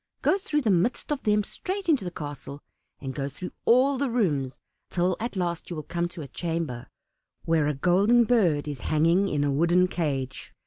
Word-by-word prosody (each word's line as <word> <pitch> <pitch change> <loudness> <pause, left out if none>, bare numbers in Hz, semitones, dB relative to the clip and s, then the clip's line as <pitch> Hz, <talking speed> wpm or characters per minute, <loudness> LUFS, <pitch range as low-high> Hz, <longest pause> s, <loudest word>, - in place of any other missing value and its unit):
Go 390 - +3
through 300 -5 -1
the 225 -6 +2
midst 190 - 0
of 285 -2 -1
them 210 -1 +2
straight 380 - -5
into 290 - +3
the 180 - -3
castle, 145 -3 -8 0.4
and 135 -1 -5
go 140 0 -3
through 165 +6 -7
all 260 +3 +4
the 280 -2 0
rooms, 150 - 0 0.3
till 180 0 +1
at 235 0 -4
last 175 -3 -2
you 175 - -4
will 155 - -5
come 170 +2 -2
to 170 -2 -8
a - - -8
chamber 160 -4 -4 0.6
where 160 -3 +2
a 150 - 0
Golden 195 - +4
Bird 185 -12 +2
is 145 -3 -5
hanging 165 +6 +3
in 145 -1 0
a 145 - +1
wooden 170 +5 +3
cage. 135 -7 -3
175 Hz, 195 wpm, -26 LUFS, 145-220 Hz, 0.6 s, all